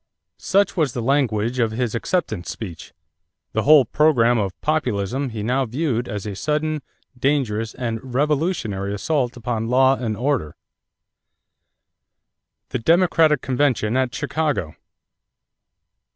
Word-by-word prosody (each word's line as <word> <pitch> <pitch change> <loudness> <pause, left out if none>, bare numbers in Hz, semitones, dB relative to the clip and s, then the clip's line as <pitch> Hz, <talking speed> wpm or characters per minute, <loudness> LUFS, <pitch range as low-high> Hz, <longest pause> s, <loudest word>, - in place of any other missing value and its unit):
Such 200 +1 +2
was 155 -8 +1
the 120 - -3
language 120 -3 +1
of 115 -2 +2
his 115 0 -2
acceptance 115 - -2
speech. 90 -8 -7 0.6
The 110 - 0
whole 145 +1 +6
program 120 -4 +3
of 100 -3 -3
Populism 135 -4 -1
he 110 -3 -5
now 130 +3 0
viewed 125 -1 -1
as 105 -3 -5
a 105 -2 -4
"sudden, 150 +5 -1 0.3
dangerous, 125 -5 0
and 115 -2 -3
revolutionary 130 - -1
assault 125 +3 -1
upon 115 -1 -3
law 130 +2 +4
and 115 -5 -3
order." 125 - -1 2.1
=The - - -2
Democratic 165 0 +3
Convention 125 -4 +1
at 130 -1 0
Chicago. 150 - -2
125 Hz, 120 wpm, -22 LUFS, 110-150 Hz, 2.1 s, whole